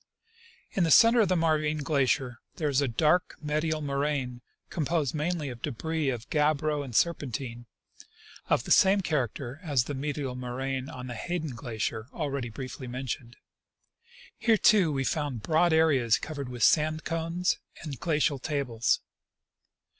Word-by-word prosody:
In 190 - +1
the 165 - +2
center 230 +8 +7
of 210 - +3
the 185 - +2
Marvine 155 -2 +1
glacier 130 -5 +1 0.2
there 155 -3 -1
is 140 0 +2
a 140 - +1
dark 155 +9 +2
medial 155 +1 -1
moraine, 140 -3 -2 0.3
composed 155 -3 0
mainly 155 -1 -1
of 120 -2 -9
debris 155 +2 -2
of 120 -2 -4
gabbro 150 0 +1
and 125 -5 -8
serpentine, 125 -7 -1 0.8
of - - +2
the - - -6
same 195 +1 +6
character 140 - -2
as 145 -8 +1
the 145 - -5
medial 140 -1 -3
moraine 130 +1 -4
on 125 0 -7
the 125 - -5
Hayden 160 +5 -3
glacier, 115 -2 -4
already 140 -6 -3
briefly 130 +2 -7
mentioned. 125 -1 -5 1.0
Here, 225 0 +4
too, 205 -8 +5
we 135 -2 -1
found 140 -6 -2
broad 165 +4 +3
areas 140 -9 +4
covered 140 +2 -6
with 120 -2 -3
sand 155 0 +3
cones 165 +2 -1 0.2
and 140 -6 -6
glacial 150 -4 +1
tables. 125 -5 0
145 Hz, 145 wpm, -28 LUFS, 125-160 Hz, 1.0 s, center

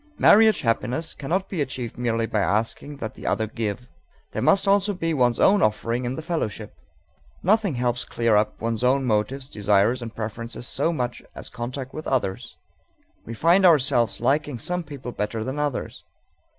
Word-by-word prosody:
Marriage 220 +1 +6
happiness 130 +5 -1
cannot 185 +7 -2
be 175 -6 -3
achieved 130 -4 -4
merely 115 -2 0
by 110 - -1
asking 115 +8 -1
that 110 -4 -5
the - - -9
other 110 - +1
give. 110 +2 -4 0.4
There - - -3
must 195 +1 +4
also 200 0 +3
be 165 -2 -1
one's 125 -5 +2
own 200 0 +5
offering 115 +2 0
in 125 +2 -2
the 160 - -6
fellowship. 155 - -3 0.7
Nothing 200 -4 +2
helps 120 0 -1
clear 115 -2 +1
up 105 +1 +1
one's 115 +1 -2
own 130 +2 +3
motives, 125 +4 -1
desires, 105 +2 +2
and 115 -1 -7
preferences 115 +2 -5
so 145 +5 0
much 125 -6 -3
as - - -8
contact 125 +2 -6
with 155 - -6
others. 115 -8 -2 0.7
We 115 - -6
find 170 - +4
ourselves 135 -9 +3
liking 140 +2 0
some 180 +7 -2
people 140 -5 -8
better 110 0 -3
than 130 +5 -4
others. 145 -3 -3
125 Hz, 170 wpm, -24 LUFS, 115-155 Hz, 0.7 s, Marriage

